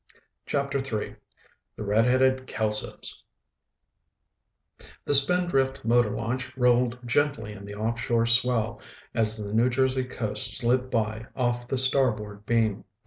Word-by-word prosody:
CHAPTER 140 -1 -1
III 115 -6 -4 0.6
The - - -6
Redheaded 130 +5 +2
Kelsos 105 -1 -3 1.8
The - - 0
Spindrift 140 -4 +3
motor 120 -1 +3
launch 125 +5 -4
rolled 125 -1 +2
gently 120 -4 0
in 100 -1 -11
the 100 0 -8
offshore 115 +2 -1
swell 115 -2 +2 0.3
as 110 -1 +2
the 105 -1 -6
New 115 +3 +3
Jersey 130 0 0
coast 110 -4 -2
slid 125 +1 0
by 110 -1 -2
off 120 -1 -1
the 135 - -2
starboard 110 -6 +2
beam. 115 -3 +1
120 Hz, 120 wpm, -26 LUFS, 110-130 Hz, 1.8 s, Spindrift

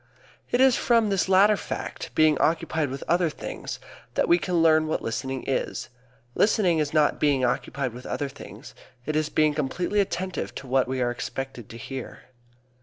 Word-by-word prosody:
It 245 - +1
is 265 -2 +6
from 230 -3 +2
this 195 -1 0
latter 200 +3 +6
fact - - -5
being 155 -1 +5
occupied 160 -2 +1
with 135 +1 -6
other 175 0 +2
things - - -6 0.4
that - - +2
we 175 - +5
can 175 +3 -2
learn 160 -1 +4
what 155 - -2
listening 130 +3 -3
is. 135 - -2 0.4
Listening 190 - +3
is 150 -1 0
not 155 -1 +2
being 140 -4 +2
occupied 130 +1 -2
with 125 +1 -9
other 145 - -2
things. - - -11 0.3
It 155 - -2
is 155 0 +1
being 155 -1 +2
completely 175 +7 -1
attentive 190 -2 -2
to 135 - -7
what 130 0 +2
we 130 -1 -1
are 120 - 0
expected 125 -1 -6
to 115 - -9
hear. 130 +2 -7
155 Hz, 180 wpm, -25 LUFS, 135-180 Hz, 0.4 s, is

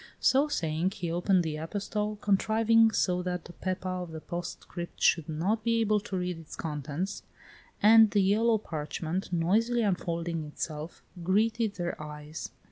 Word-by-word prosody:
So 275 +3 +4
saying, 170 - -1
he 170 -2 -3
opened 180 +1 +2
the 155 -2 -3
epistle, 210 +5 -3
contriving 225 +2 +4
so 180 -4 +1
that 180 -1 -3
the 175 - -10
Pepa 185 0 -3
of 175 - -6
the 160 - -6
postscript 175 +1 -6
should 165 -2 +3
not 190 +8 0
be 230 0 +2
able 215 -2 +3
to 195 -1 -5
read 180 -2 -2
its 160 - -10
contents, 150 +4 -4 0.6
and 220 +1 +8
the 205 -1 +3
yellow 220 +4 +3
parchment, 165 0 -4
noisily 220 +8 +2
unfolding 170 -4 -1
itself, 150 +1 -6 0.2
greeted 215 +4 +1
their 175 -4 -3
eyes. 150 +1 -7
180 Hz, 150 wpm, -29 LUFS, 165-215 Hz, 0.6 s, and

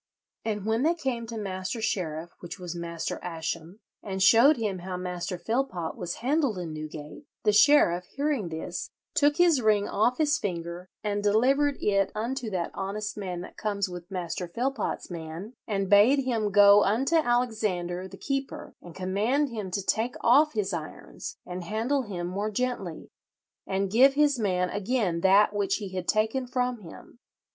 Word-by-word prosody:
"And 210 -3 -3
when 220 +2 +1
they 325 +5 +3
came 250 -7 -3
to 230 0 -6
Master 190 +2 -4
Sheriff, 170 -6 -2
which 175 - -8
was 175 -2 -6
Master 170 -1 -4
Ascham, 165 +2 -5 0.2
and 190 -2 -5
showed 240 +9 +7
him 210 -5 -2
how 180 +1 -5
Master 180 0 -4
Philpot 220 -5 -2
was 175 -1 -4
handled 275 -6 +1
in 170 -3 -5
Newgate, 155 - -8 0.2
the 210 -2 +3
sheriff, 205 -8 +5
hearing 280 - -2
this, 160 0 -5 0.2
took 290 0 +3
his 340 -6 +4
ring 210 -2 +3
off 240 +4 +1
his 295 -2 +2
finger 175 -2 -5
and 205 -1 -1
delivered 265 +8 +3
it 195 -2 +1
unto 235 +2 -3
that 180 -4 -2
honest 205 +2 -4
man 185 -4 -4
that - - -10
comes 205 -2 -1
with 175 0 -8
Master 180 -1 -4
Philpot's 240 +2 -3
man, 170 +6 -7
and 195 -3 -1
bade 225 +8 +5
him 225 -5 0
go 205 0 +7
unto 265 +11 +2
Alexander 215 - 0
the - - -12
keeper 275 +2 -4
and 175 -2 -12
command 215 +10 0
him 215 -5 -5
to 190 +1 -3
take 235 +3 0
off 290 +6 +5
his 205 -3 -1
irons 160 -2 -7
and 180 0 -6
handle 225 +9 0
him 190 -7 -5
more 200 +4 -2
gently, 210 -7 -3 0.6
and 195 0 -1
give 265 +5 +6
his 290 -3 +3
man 180 -4 0
again 205 -5 0
that 200 +3 +5
which 200 -1 +1
he 205 -3 -5
had 185 -1 -5
taken 220 +4 +1
from 250 -1 -1
him. 190 +5 -13
205 Hz, 170 wpm, -27 LUFS, 180-245 Hz, 0.6 s, showed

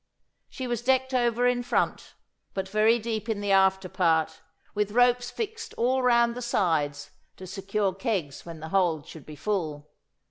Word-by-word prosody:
She 260 - -6
was 240 -2 -2
decked 260 +1 +1
over 240 -1 +2
in 245 0 +2
front, 245 - -1 0.4
but 190 -1 -2
very 215 +4 +3
deep 225 -1 -4
in 220 -2 -1
the 205 -1 -1
after 190 -1 +3
part, 160 -3 +1 0.3
with 210 -1 0
ropes 245 0 +3
fixed 450 0 -5
all 255 +2 +1
round 235 -1 +4
the 250 - -6
sides 160 -11 0 0.3
to 190 - -9
secure 195 +1 -2
kegs 185 - -3
when 165 -2 -9
the 160 - -6
hold 170 -5 +1
should 160 -3 -12
be 155 - -9
full. 155 -6 -3
205 Hz, 170 wpm, -27 LUFS, 175-240 Hz, 0.4 s, round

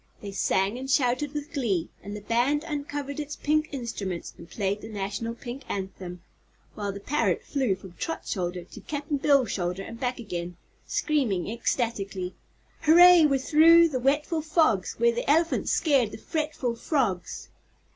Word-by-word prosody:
They 200 - -7
sang 195 +3 0
and 265 +1 -6
shouted 265 +1 +2
with 295 +2 -5
glee 220 - 0
and 205 +1 -7
the 210 - -7
Band 245 +8 +1
uncovered 290 -2 -4
its 295 0 -4
pink 305 +1 0
instruments 220 - -5
and 170 - -13
played 200 0 -2
the 220 - -8
National 205 +3 -4
Pink 245 +2 -7
Anthem, 185 -2 -5 0.5
while 205 -1 -3
the 200 - -7
parrot 295 +9 0
flew 260 -9 0
from 185 -1 -13
Trot's 325 - -4
shoulder 180 -2 -2
to - - -12
Cap'n 290 0 -3
Bill's 275 -3 +3
shoulder 180 +1 -2
and 230 +3 -9
back 250 0 -1
again, 175 -6 -5 0.3
screaming 250 - 0
ecstatically: 205 -6 -2 0.5
"Hooray! 340 +1 +8
we're 275 -2 +2
through 330 +4 +6
the 260 -4 -2
wetful 295 +5 +1
fogs 310 - +2
Where 235 0 +3
the 240 +3 -3
elephant 330 +3 +2
scared 275 - +3
the 215 - -9
fretful 300 -4 -2
frogs!" 230 - -2
245 Hz, 160 wpm, -27 LUFS, 200-295 Hz, 0.5 s, Hooray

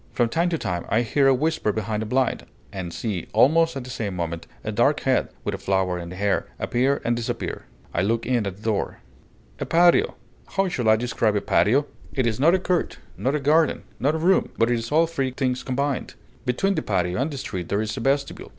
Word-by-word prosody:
From 120 -2 +2
time 170 +8 +1
to 165 - 0
time 90 - -3
I 110 +4 +2
hear 135 +4 +2
a 135 - +6
whisper 155 -5 0
behind 110 0 -2
a 110 - -3
blind, 130 +2 0 0.3
and 90 -3 -5
see, 100 -2 -3
almost 165 +8 +4
at 135 - -4
the 125 - -8
same 105 -5 -3
moment, 85 -1 -4 0.2
a - - -3
dark - - +2
head, - - +1
with - - -2
a - - -4
flower 95 -2 0
in 85 0 -7
the 90 - -8
hair, 100 +1 0
appear 130 +3 0
and 120 - +2
disappear. 120 -1 -4 0.3
I 85 - +1
look 115 +4 0
in 120 -4 +1
at 95 - -3
a - - -17
door.... 110 -2 -1 0.6
A - - -2
patio! 175 +1 +4 0.4
How 195 -1 +3
shall 125 -10 0
I 110 - +7
describe 115 -2 0
a 100 - +1
patio? 135 +8 +3 0.3
It 130 -3 +1
is 115 -1 0
not 165 +6 +5
a - - +3
court, 180 -1 -1 0.2
nor 135 +3 0
a - - +1
garden, 150 +2 +2 0.2
nor 145 +4 +1
a - - 0
room; 180 +4 +3
but 115 +1 +3
it 120 - +2
is 115 0 -6
all 160 +2 +5
three 140 -5 -2
things 130 -1 -1
combined. 140 +1 -2 0.3
Between 195 +11 +1
the 160 - -1
patio 90 -1 0
and 140 - 0
the 145 - -6
street 90 -9 -5
there 100 - +1
is 110 - -3
a - - -4
vestibule. 140 +3 -1
125 Hz, 230 wpm, -24 LUFS, 105-145 Hz, 0.6 s, I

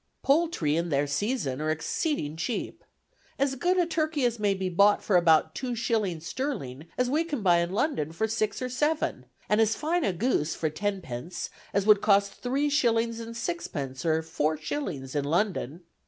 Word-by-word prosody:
"Poultry 275 - +2
in 170 +1 -1
their 145 -1 +2
season 145 - -1
are 155 - -1
exceeding 160 - -1
cheap. 165 +9 -4 0.5
As 275 0 +1
good 355 +7 +1
a 355 - +4
turkey 310 -5 0
may 205 -2 +2
be 190 -1 -2
bought 200 +3 +4
for 200 - +1
about 160 -2 +4
two 250 +4 -3
shillings 210 -8 -1
sterling 160 - -4
as 250 - +2
we 300 +6 +1
can 295 -9 -4
buy 175 -2 +5
in 170 +1 -1
London 195 - 0
for 190 +7 -1
six 215 +1 -1
or - - -1
seven, 295 +5 -1 0.2
and 210 +1 +3
as 220 0 +3
fine 335 +3 0
a 195 - +2
goose 175 - 0
for 155 -2 -1
tenpence 175 -4 -4 0.2
as 200 0 +1
would 210 -1 +6
cost 200 -1 +3
three 270 +4 0
shillings 230 -5 +1
and 230 0 -7
sixpence 140 - -4
or 160 -1 +1
four 155 -1 -1
shillings 150 - -4
in 145 -2 0
London. 170 - -1
200 Hz, 180 wpm, -27 LUFS, 160-255 Hz, 0.5 s, would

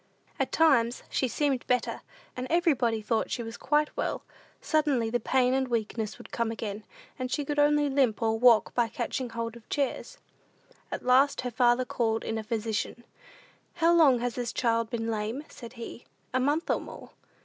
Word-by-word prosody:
At - - 0
times 250 -7 +3
she 260 - +1
seemed 270 0 0
better; 250 0 0 0.3
and 255 0 -4
when 335 - +4
everybody 245 -10 +1
thought 225 +1 0
she 240 - -3
was 225 0 -7
quite 300 +1 0
well, - - -2 0.4
suddenly 295 - +1
the 240 - +1
pain 255 0 +2
and 265 0 +1
weakness 220 -2 -2
would - - -13
come 235 -1 -1
again, 220 -2 -5 0.4
and 255 0 -2
she 290 +3 -1
could 295 +1 -1
only 295 0 +4
limp, 270 -6 +2
or 225 -1 0
walk 235 -2 +5
by 240 -1 +2
catching 240 +2 -3
hold 230 0 -4
of 235 -2 -15
chairs. 290 - -2 0.7
At - - -5
last 265 +3 +4
her 250 -1 -4
father 240 +2 +3
called 225 -2 -1
in 225 0 -2
a - - -5
physician. 225 +1 -3 0.7
"How 335 0 +4
long 300 -7 +6
has 245 -1 -1
this 245 -1 -3
child 230 -2 0
been 225 -1 -2
lame?" 220 +6 -3
said 235 -1 -11
he. 235 0 -9 0.3
"A 255 - +2
month 290 +6 +1
or - - 0
more." - - -11
245 Hz, 185 wpm, -28 LUFS, 230-275 Hz, 0.7 s, long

